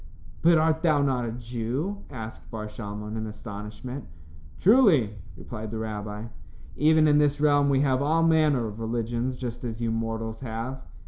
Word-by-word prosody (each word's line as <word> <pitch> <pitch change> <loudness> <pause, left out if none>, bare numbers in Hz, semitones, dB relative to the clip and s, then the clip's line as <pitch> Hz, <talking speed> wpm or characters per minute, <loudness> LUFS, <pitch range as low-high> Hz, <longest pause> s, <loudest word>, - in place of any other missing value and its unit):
"But 170 0 +6
art 160 0 +2
thou 155 -4 +3
not 125 -4 0
a - - -4
Jew?" 125 - -3
asked 110 -4 -8
Bar 110 -1 -5
Shalmon, 105 0 -6
in 110 0 -3
astonishment. 105 +5 -7 0.5
"Truly," 175 - +5 0.2
replied 110 -2 -7
the 110 - -4
rabbi. 105 -1 -4 0.5
"Even 155 +1 +5
in 150 0 +5
this 145 -1 +2
realm 145 -1 +4
we 135 -1 +3
have 135 -2 +2
all 160 +3 +2
manner 155 -6 +3
of 105 0 -6
religions 120 +2 -2
just 125 -1 -6
as 115 -2 -4
you 115 -1 -1
mortals 115 0 -3
have." 125 +2 -5
120 Hz, 165 wpm, -26 LUFS, 110-145 Hz, 0.5 s, But